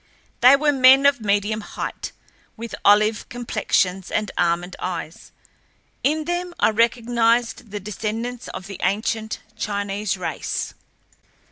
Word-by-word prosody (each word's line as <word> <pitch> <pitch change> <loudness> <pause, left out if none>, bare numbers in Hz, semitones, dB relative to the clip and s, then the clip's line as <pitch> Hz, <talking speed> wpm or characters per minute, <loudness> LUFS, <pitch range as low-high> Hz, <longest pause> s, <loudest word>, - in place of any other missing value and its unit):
They 255 +3 +8
were 295 +1 +2
men 265 0 +6
of 280 -4 +4
medium 205 +1 0
height, - - -6 0.5
with 230 +1 -7
olive 210 +1 +4
complexions 190 -6 -1
and 210 -2 -1
almond 175 +1 0
eyes. 175 -3 -6 0.7
In 305 +2 +1
them 350 +1 -3
I - - +4
recognized 235 +1 +1
the 205 +1 -5
descendants 225 +4 -4
of 185 - -7
the 195 -1 -9
ancient 220 +1 -1
Chinese 205 -1 -2
race. 185 - -3
220 Hz, 120 wpm, -22 LUFS, 200-245 Hz, 0.7 s, They